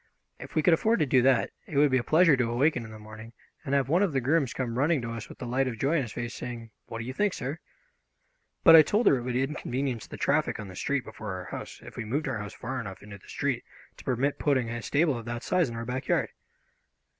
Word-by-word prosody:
If - - -10
we 155 - +2
could 175 - +5
afford 220 +8 +3
to - - +4
do 130 -2 +4
that, 130 -1 +3 0.2
it 145 - -4
would 145 -1 +5
be 130 - +4
a - - -3
pleasure 165 +1 +5
to 125 -3 0
awaken 125 +1 +1
in - - -10
the 110 - -10
morning 110 +2 -11 0.3
and 140 -2 -1
have 135 -2 +2
one 170 +6 +3
of 195 -7 +1
the 135 - +2
grooms 135 0 +1
come 125 -2 -3
running 150 +2 +3
to 115 - -4
us 115 -1 -6
with - - -11
the - - -6
light 130 +2 0
of 120 -3 -4
joy 140 +8 +1
on - - +2
his 120 -5 -5
face, 120 0 -4
saying, 115 -2 -7 0.2
"What 115 - -6
do 115 - -5
you 130 - -5
think, 205 +6 +1
sir? 140 +6 -4 1.0
"But 165 -3 +9
I 160 - +11
told 210 +9 +1
her 140 - +6
it - - -4
would 125 0 -3
inconvenience 130 -3 -2
the - - -8
traffic 150 -3 +1
on 105 -2 -7
the 95 - -10
street 140 +6 -1
before 105 -3 -7
our 90 -1 -6
house - - -8
if - - -12
we 120 - -3
moved 140 +8 -1
our 125 -5 -2
house 105 0 -6
far 130 +2 -4
enough 95 -3 -8
into 100 -1 -10
the - - -19
street - - -1 0.3
to - - -12
permit 135 +3 0
putting 130 -5 +1
a 120 0 -4
stable 145 +5 +2
of 115 -2 -6
that 120 0 -5
size 180 -6 +1
in 115 - -7
our 115 0 -4
backyard." 125 +2 -1
130 Hz, 270 wpm, -28 LUFS, 115-145 Hz, 1.0 s, I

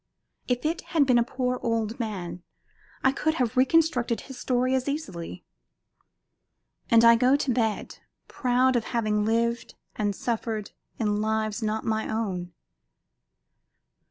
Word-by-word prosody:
If 250 +2 -1
it 325 +2 0 0.2
had 290 - +6
been 250 -2 +4
a - - +4
poor 250 +1 -2
old 230 -1 -1
man 190 -6 -4 0.6
I 265 - +5
could 315 +3 0
have 245 -6 0
reconstructed 260 -3 +2
his 265 -3 -10
story 255 0 +1
as 260 +1 0
easily. 185 - -5 1.4
And 230 0 +6
I 230 0 +8
go 250 +3 +4
to 280 -3 0
bed, 225 -3 -1 0.3
proud 255 0 +2
of 235 - +1
having 215 -3 0
lived 235 +1 0 0.2
and 205 -2 -1
suffered 225 -2 -3 0.3
in 210 -2 0
lives 220 +1 -1
not 220 +1 -2
my 220 -1 -1
own. 190 -6 -3
235 Hz, 135 wpm, -26 LUFS, 215-255 Hz, 1.4 s, I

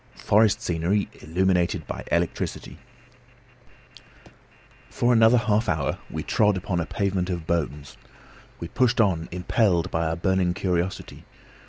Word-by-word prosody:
FOREST 105 0 +2
SCENERY 90 +4 0
ILLUMINATED 90 +2 0
BY - - -6
ELECTRICITY 85 0 -2 2.1
For 120 +1 +1
another 115 +1 +5
half 110 -1 +1
hour - - -1
we - - -5
trod 105 -2 +2
upon 90 -1 -2
a 85 - -3
pavement 95 -2 -1
of 85 -3 -4
bones. 75 -5 -3 0.6
We 85 - -5
pushed 125 +6 +1
on, 90 -7 +1
impelled 90 0 0
by 80 0 0
our 80 - -1
burning 90 0 0
curiosity. 90 +1 -3
90 Hz, 125 wpm, -24 LUFS, 85-105 Hz, 2.1 s, another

